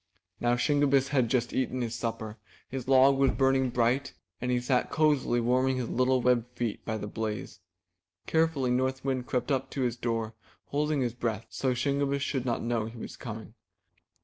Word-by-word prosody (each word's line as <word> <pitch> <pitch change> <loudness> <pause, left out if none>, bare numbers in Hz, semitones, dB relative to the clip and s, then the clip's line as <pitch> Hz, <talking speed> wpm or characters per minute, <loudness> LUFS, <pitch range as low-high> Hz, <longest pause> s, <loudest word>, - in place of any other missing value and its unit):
Now 120 0 +2
Shingebiss 140 0 +2
had 130 -5 +2
just 120 -1 0
eaten 130 0 -1
his 115 -1 -3
supper, 115 -2 -4 0.3
his 130 -1 -6
log 135 +1 +5
was 135 -1 +5
burning 135 -1 +2
bright, 125 +3 +1 0.3
and 125 - -2
he 125 -1 +2
sat 125 0 +1
cozily 150 -6 +2
warming 130 +2 +2
his 125 -3 -3
little 130 0 +2
webbed 125 -2 +3
feet 115 -3 -2
by 110 -1 -2
the 105 - -5
blaze. 105 -2 -4 0.7
Carefully 160 -6 +1
North 130 +1 0
Wind 130 -2 -1
crept 125 +3 -1
up 135 -1 0
to 135 - -4
his 120 -2 0
door, 115 -2 -2 0.4
holding 150 0 0
his 120 -2 0
breath, 115 -2 -3
so 130 -2 0
Shingebiss 140 +2 0
should 135 -3 -2
not 120 -2 -1
know 115 -2 0
he 115 +1 -10
was - - -7
coming. - - -8
125 Hz, 180 wpm, -29 LUFS, 120-135 Hz, 0.7 s, log